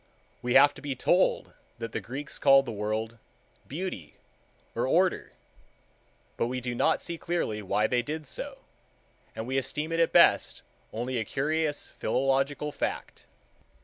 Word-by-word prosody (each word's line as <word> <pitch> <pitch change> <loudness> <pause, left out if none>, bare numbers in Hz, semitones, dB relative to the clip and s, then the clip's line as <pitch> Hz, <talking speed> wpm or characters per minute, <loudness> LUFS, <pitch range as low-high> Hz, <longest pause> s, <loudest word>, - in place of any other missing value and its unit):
We 120 0 -1
have 145 +2 +7
to 140 - -12
be 140 -1 -3
told 175 +8 +2 0.2
that 115 0 -5
the - - -3
Greeks 140 +4 -4
called 135 -1 +6
the 120 - -4
world 110 +1 -2
Κόσμος 115 -1 -30
Beauty, 150 - -5 0.6
or - - -1
Order, - - +1 1.0
but - - +1
we 125 +1 -3
do 125 0 -4
not 120 - +1
see 170 -1 -5
clearly 140 -11 -2
why 105 +2 +1
they 120 +2 +2
did 155 +5 -5
so, - - -6 0.7
and 110 - -4
we 130 +2 0
esteem 150 +4 -4
it 165 - 0
at 165 - +3
best - - +4 0.3
only 120 +2 -2
a - - 0
curious 150 +5 -1
philological 135 +2 0
fact. - - -4
135 Hz, 155 wpm, -28 LUFS, 115-150 Hz, 1.0 s, have